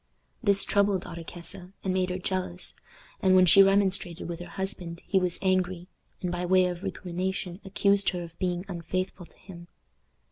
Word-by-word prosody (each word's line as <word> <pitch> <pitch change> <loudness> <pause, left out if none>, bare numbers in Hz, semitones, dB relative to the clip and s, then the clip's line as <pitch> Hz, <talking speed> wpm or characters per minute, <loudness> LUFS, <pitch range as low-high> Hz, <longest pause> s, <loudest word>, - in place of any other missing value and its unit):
This 200 -4 +5
troubled 200 -2 +1
Ottokesa, 175 +2 -7
and 190 - 0
made 185 0 +1
her 180 - -2
jealous; 185 - -3 0.5
and 185 0 +4
when 185 0 +7
she 190 +3 +8
remonstrated 195 -3 +2
with 170 -1 -5
her 175 - -7
husband 180 -3 -5
he 195 - +2
was 180 -2 -1
angry, 185 -1 0 0.3
and 180 - -1
by 175 0 -3
way 185 +1 +4
of 180 -1 -3
recrimination 185 0 -4
accused 200 0 +2
her 180 -2 -4
of 165 -1 -12
being 180 -1 -1
unfaithful 185 0 -4
to - - -20
him. 175 -3 -12
185 Hz, 170 wpm, -27 LUFS, 175-190 Hz, 0.5 s, she